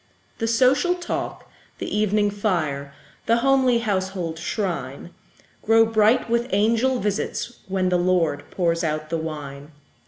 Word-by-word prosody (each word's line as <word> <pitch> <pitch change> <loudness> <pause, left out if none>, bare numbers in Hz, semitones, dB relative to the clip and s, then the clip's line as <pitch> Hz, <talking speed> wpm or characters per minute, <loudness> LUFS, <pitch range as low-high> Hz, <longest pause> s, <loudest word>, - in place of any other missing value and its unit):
The 225 - -1
social 265 +9 +3
talk, 350 -1 -5 0.3
the - - -4
evening 210 0 +2
fire, 160 -9 -2 0.4
The 230 +1 +4
homely 265 -3 +4
household 190 -6 -2
shrine, 170 - -4 0.5
Grow 225 +1 +5
bright 225 +2 +3
with 235 +1 0
angel 230 +6 +2
visits, 210 +3 -3
when 190 -1 0
The 180 -1 +2
Lord 175 -5 +1
pours 170 -2 0
out 155 0 -2
the 165 - 0
wine. 150 -2 -7
200 Hz, 130 wpm, -23 LUFS, 165-230 Hz, 0.5 s, Grow